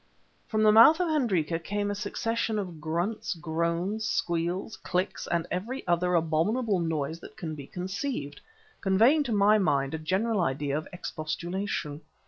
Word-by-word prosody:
From 215 Hz, -1 st, +1 dB
the 215 Hz, -, +7 dB
mouth 230 Hz, +10 st, +8 dB
of 360 Hz, -2 st, +1 dB
Hendrika 190 Hz, -, +1 dB
came 205 Hz, +3 st, -2 dB
a -, -, -1 dB
succession 220 Hz, +2 st, -2 dB
of 180 Hz, -6 st, -5 dB
grunts, 175 Hz, +6 st, -2 dB
groans, 170 Hz, +5 st, -1 dB
squeals, 175 Hz, +1 st, -1 dB
clicks, 180 Hz, +1 st, -2 dB
and 170 Hz, -1 st, 0 dB
every 230 Hz, +9 st, -3 dB
other 175 Hz, +1 st, +2 dB
abominable 180 Hz, +7 st, +1 dB
noise 160 Hz, -1 st, -2 dB
that -, -, -13 dB
can 160 Hz, -2 st, -5 dB
be 140 Hz, -3 st, -8 dB
conceived, 185 Hz, -, -4 dB, 0.4 s
conveying 225 Hz, +10 st, +4 dB
to 270 Hz, -5 st, -2 dB
my 210 Hz, +1 st, +5 dB
mind 140 Hz, -6 st, +1 dB
a 160 Hz, -, -2 dB
general 195 Hz, +7 st, 0 dB
idea 140 Hz, -2 st, -1 dB
of 155 Hz, -, -3 dB
expostulation. 170 Hz, -1 st, -4 dB
180 Hz, 150 wpm, -28 LUFS, 160-215 Hz, 0.4 s, mouth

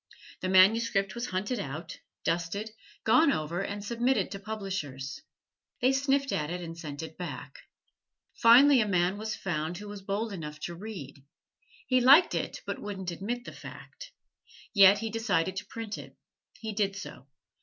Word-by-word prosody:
The 185 Hz, -, -2 dB
manuscript 195 Hz, +1 st, +4 dB
was 235 Hz, +1 st, -4 dB
hunted 205 Hz, +6 st, -2 dB
out, 155 Hz, 0 st, -6 dB, 0.2 s
dusted, 175 Hz, +6 st, -2 dB, 0.3 s
gone 250 Hz, +7 st, +5 dB
over, 165 Hz, -, -2 dB
and 200 Hz, +1 st, -4 dB
submitted 240 Hz, +4 st, +1 dB
to 195 Hz, -, -5 dB
publishers. 195 Hz, -, -5 dB, 0.6 s
They 255 Hz, +2 st, +4 dB
sniffed 275 Hz, 0 st, +1 dB
at 150 Hz, -1 st, -1 dB
it 180 Hz, +1 st, -3 dB
and 165 Hz, -1 st, -7 dB
sent 155 Hz, -3 st, -7 dB
it 160 Hz, +1 st, -9 dB
back. 180 Hz, -, -7 dB, 0.7 s
Finally 255 Hz, +3 st, +7 dB
a 215 Hz, -, 0 dB
man 185 Hz, +1 st, +1 dB
was 220 Hz, 0 st, -3 dB
found 165 Hz, -1 st, -3 dB
who 210 Hz, +2 st, -8 dB
was 205 Hz, -1 st, -8 dB
bold 205 Hz, +3 st, -2 dB
enough 155 Hz, -4 st, -7 dB
to 175 Hz, -, -4 dB
read. 170 Hz, -8 st, -8 dB, 0.6 s
He 255 Hz, -1 st, +3 dB
liked 280 Hz, +8 st, +7 dB
it, -, -, -3 dB
but -, -, -4 dB
wouldn't 190 Hz, -3 st, -5 dB
admit 235 Hz, +8 st, -4 dB
the -, -, -7 dB
fact. -, -, -11 dB, 0.6 s
Yet 200 Hz, -1 st, +8 dB
he 225 Hz, +1 st, -4 dB
decided 195 Hz, -6 st, 0 dB
to 200 Hz, -, -5 dB
print 225 Hz, -2 st, -6 dB
it. -, -, -12 dB, 0.4 s
He 220 Hz, -1 st, -5 dB
did 200 Hz, -1 st, 0 dB
so. 190 Hz, -9 st, -9 dB
200 Hz, 165 wpm, -29 LUFS, 175-225 Hz, 0.7 s, Yet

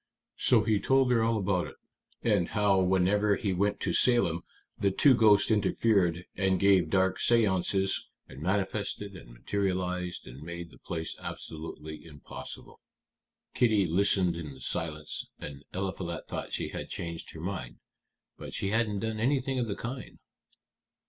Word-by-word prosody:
So -, -, +4 dB
he 110 Hz, -3 st, +2 dB
told 130 Hz, +4 st, +3 dB
her 115 Hz, -2 st, +4 dB
all 115 Hz, 0 st, +2 dB
about 95 Hz, -3 st, 0 dB
it, -, -, -11 dB, 0.5 s
and 100 Hz, -7 st, +2 dB
how 100 Hz, -3 st, +3 dB
whenever 95 Hz, +3 st, +3 dB
he 100 Hz, -3 st, -1 dB
went 100 Hz, +3 st, +1 dB
to 90 Hz, -, 0 dB
Salem 105 Hz, -10 st, +3 dB, 0.4 s
the 100 Hz, -, +3 dB
two 135 Hz, +8 st, +5 dB
ghosts 105 Hz, -3 st, +5 dB
interfered, 100 Hz, -5 st, +2 dB
and 95 Hz, -2 st, +1 dB
gave 95 Hz, -4 st, +4 dB
dark 95 Hz, +1 st, +2 dB
séances 95 Hz, -4 st, +2 dB, 0.2 s
and 65 Hz, +1 st, -11 dB
manifested 100 Hz, +2 st, -1 dB
and -, -, -12 dB
materialized 90 Hz, +4 st, -2 dB
and 60 Hz, +4 st, -10 dB
made 85 Hz, +1 st, -7 dB
the -, -, -17 dB
place 80 Hz, -2 st, -4 dB
absolutely 80 Hz, -1 st, -7 dB
impossible. 75 Hz, -3 st, -10 dB, 0.7 s
Kitty 110 Hz, -5 st, +3 dB
listened 90 Hz, 0 st, +2 dB
in 75 Hz, -5 st, -7 dB
silence, 75 Hz, +3 st, -3 dB
and 70 Hz, -1 st, -8 dB
Eliphalet 95 Hz, -3 st, -4 dB
thought -, -, -5 dB
she -, -, -2 dB
had -, -, -6 dB
changed 85 Hz, -1 st, -5 dB
her -, -, -7 dB
mind. 85 Hz, -8 st, -5 dB, 0.6 s
But -, -, -6 dB
she 95 Hz, -, -1 dB
hadn't 105 Hz, -2 st, +1 dB
done 110 Hz, -1 st, -2 dB
anything 130 Hz, +2 st, +1 dB
of 120 Hz, -, 0 dB
the 100 Hz, -, -2 dB
kind." 125 Hz, +3 st, -6 dB
95 Hz, 150 wpm, -29 LUFS, 85-105 Hz, 0.7 s, two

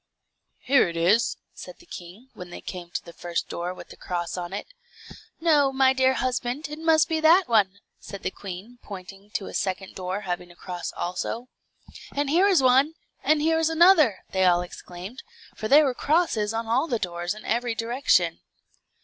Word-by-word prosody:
"Here 265 Hz, -8 st, +4 dB
it 170 Hz, -, -6 dB
is," 195 Hz, +8 st, +3 dB, 0.2 s
said -, -, -10 dB
the 350 Hz, -, -19 dB
king, 195 Hz, -, -11 dB
when 180 Hz, -1 st, -9 dB
they 175 Hz, -, -8 dB
came 175 Hz, -2 st, -8 dB
to -, -, -5 dB
the 170 Hz, -, -11 dB
first 170 Hz, 0 st, -3 dB
door 175 Hz, +1 st, -3 dB
with 185 Hz, -, -10 dB
a -, -, -15 dB
cross 175 Hz, -2 st, -4 dB
on 175 Hz, -1 st, -5 dB
it. 200 Hz, -, -4 dB, 0.7 s
"No, 295 Hz, -5 st, +4 dB
my 265 Hz, 0 st, +4 dB
dear 260 Hz, 0 st, +3 dB
husband, 255 Hz, +3 st, -2 dB
it 300 Hz, +1 st, -7 dB
must 320 Hz, -1 st, +4 dB
be 320 Hz, -1 st, 0 dB
that 330 Hz, +4 st, +6 dB
one," 200 Hz, -4 st, +2 dB, 0.2 s
said 200 Hz, -, -9 dB
the -, -, -1 dB
queen, 200 Hz, +6 st, -9 dB
pointing 195 Hz, 0 st, -10 dB
to 195 Hz, -, -1 dB
a -, -, -8 dB
second 190 Hz, 0 st, -2 dB
door 185 Hz, +2 st, -4 dB
having 180 Hz, -2 st, -4 dB
a 175 Hz, -, -16 dB
cross 180 Hz, 0 st, -6 dB
also. 225 Hz, +7 st, -4 dB, 0.7 s
"And 285 Hz, 0 st, 0 dB
here 360 Hz, +5 st, +5 dB
is 370 Hz, -9 st, +4 dB
one, 265 Hz, +5 st, +4 dB, 0.3 s
and 310 Hz, -1 st, +3 dB
there 320 Hz, +1 st, +2 dB
is 325 Hz, 0 st, +2 dB
another!" 325 Hz, -, +5 dB
they 190 Hz, -1 st, +1 dB
all 175 Hz, -1 st, +4 dB
exclaimed; 180 Hz, +6 st, -9 dB, 0.3 s
for 215 Hz, -, -4 dB
there 295 Hz, +5 st, +7 dB
were 265 Hz, -, +1 dB
crosses 280 Hz, -8 st, +1 dB
on 225 Hz, +1 st, -2 dB
all 245 Hz, +7 st, +1 dB
the 240 Hz, -, 0 dB
doors 175 Hz, -1 st, -3 dB
in 215 Hz, -, -12 dB
every 235 Hz, 0 st, 0 dB
direction. 240 Hz, +5 st, +1 dB
230 Hz, 190 wpm, -25 LUFS, 185-280 Hz, 0.7 s, there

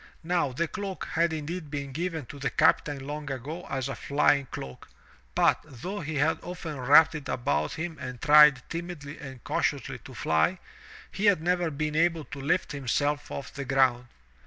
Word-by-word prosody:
Now 170 Hz, -4 st, +1 dB
the 165 Hz, +7 st, -1 dB
cloak 195 Hz, 0 st, -5 dB
had 170 Hz, +1 st, +2 dB
indeed 160 Hz, +1 st, -4 dB
been 140 Hz, -1 st, -4 dB
given 160 Hz, 0 st, -3 dB
to 140 Hz, -, -10 dB
the 140 Hz, -1 st, -1 dB
captain 145 Hz, -1 st, +2 dB
long 145 Hz, +1 st, -5 dB
ago 145 Hz, +6 st, -5 dB
as 135 Hz, -1 st, -2 dB
a 135 Hz, -, -3 dB
flying 140 Hz, -1 st, +2 dB
cloak, 65 Hz, -, -8 dB, 0.5 s
but, -, -, +4 dB
though 155 Hz, -, -6 dB
he 160 Hz, -1 st, -4 dB
had 145 Hz, +3 st, +2 dB
often 170 Hz, -5 st, -6 dB
wrapped 150 Hz, +6 st, +6 dB
it 150 Hz, -3 st, -6 dB
about 75 Hz, -, 0 dB
him 160 Hz, -1 st, -5 dB
and 125 Hz, -2 st, -6 dB
tried 150 Hz, -3 st, +6 dB
timidly 165 Hz, -4 st, -6 dB
and 130 Hz, -4 st, -9 dB
cautiously -, -, -1 dB
to -, -, -12 dB
fly, 80 Hz, 0 st, +1 dB, 0.5 s
he 200 Hz, -, -2 dB
had 200 Hz, -5 st, +5 dB
never 175 Hz, +1 st, +1 dB
been 150 Hz, 0 st, -3 dB
able 165 Hz, 0 st, +2 dB
to 140 Hz, -, -8 dB
lift 165 Hz, +6 st, 0 dB
himself 145 Hz, +1 st, -1 dB
off 140 Hz, -, -6 dB
the 140 Hz, -, -5 dB
ground. 130 Hz, -2 st, +2 dB
150 Hz, 180 wpm, -28 LUFS, 135-165 Hz, 0.5 s, wrapped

